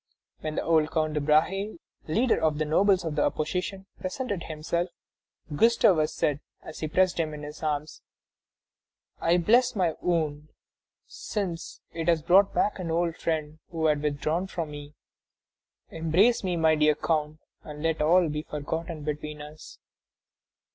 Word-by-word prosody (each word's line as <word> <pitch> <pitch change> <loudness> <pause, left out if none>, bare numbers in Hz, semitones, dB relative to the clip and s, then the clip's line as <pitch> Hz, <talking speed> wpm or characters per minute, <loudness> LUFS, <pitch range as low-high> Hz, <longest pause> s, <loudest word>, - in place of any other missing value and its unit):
When 155 0 -4
the - - -1
old 160 -2 +3
Count 155 -1 0
de 150 - 0
Brahé, 165 +8 +1 0.3
leader 230 +10 +2
of 155 -2 +2
the 155 - 0
nobles 185 +4 +3
of 155 -2 -3
the 150 - +2
opposition, 180 +5 -2
presented 195 0 -3
himself, 165 +3 -2 0.7
Gustavus 185 -6 +4
said, 145 -1 0 0.2
as 160 - -9
he 155 - -2
pressed 185 +3 +2
him 155 -2 -1
in 150 - -9
his 150 +1 -8
arms: 150 -1 -3 1.2
"I 170 +2 +3
bless 240 +8 +3
my 180 -5 +1
wound, 155 -3 -1 0.6
since 180 -5 -5
it 165 0 -4
has 165 -3 +3
brought 190 +4 +5
back 205 - 0
an 175 -2 -4
old 165 0 0
friend 155 -2 -3
who 165 -2 -2
had 150 -2 +2
withdrawn 155 +5 -1
from 165 -5 -4
me. 145 0 -9 1.0
Embrace 175 +10 +2
me, 180 -2 0
my 160 -1 +4
dear 150 -1 +3
count, 155 -1 -1 0.3
and 150 0 -8
let 160 -1 0
all 170 +3 +4
be 150 0 -3
forgotten 155 +2 -5
between 150 0 -4
us." 150 +1 -11
160 Hz, 155 wpm, -27 LUFS, 150-180 Hz, 1.2 s, brought